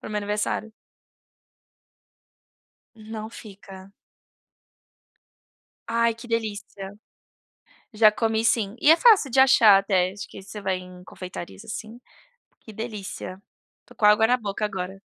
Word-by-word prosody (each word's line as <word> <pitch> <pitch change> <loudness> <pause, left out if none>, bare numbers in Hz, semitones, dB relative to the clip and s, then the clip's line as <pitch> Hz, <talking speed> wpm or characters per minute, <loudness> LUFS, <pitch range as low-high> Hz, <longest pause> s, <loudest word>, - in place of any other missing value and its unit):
para - - -8
o - - -9
meu - - -2
aniversário. 210 +1 -3 2.2
Não 220 0 -8
fica. 195 -3 -12 2.0
Ai, 230 0 +2
que 235 +2 -12
delícia! 205 -3 -4 1.0
Já 215 0 +6
comi, 220 0 0
sim, 225 -2 +1
e 305 - +6
é 330 - +6
fácil 415 - +5
de 265 - +2
achar 230 -6 +7
até, 185 -2 +1
acho 200 +1 -8
que 195 - -11
você 210 +2 -9
vai 190 -2 -1
em 180 0 -13
confeitarias, 185 +2 -9
assim, 220 +1 -8 0.6
que 220 - -13
delícia, 200 -4 -7 0.5
tô - - -18
com 210 - +2
água 210 +2 +5
na 250 +1 +2
boca 205 -1 -4
agora. 190 -1 -4
210 Hz, 130 wpm, -24 LUFS, 195-225 Hz, 2.2 s, achar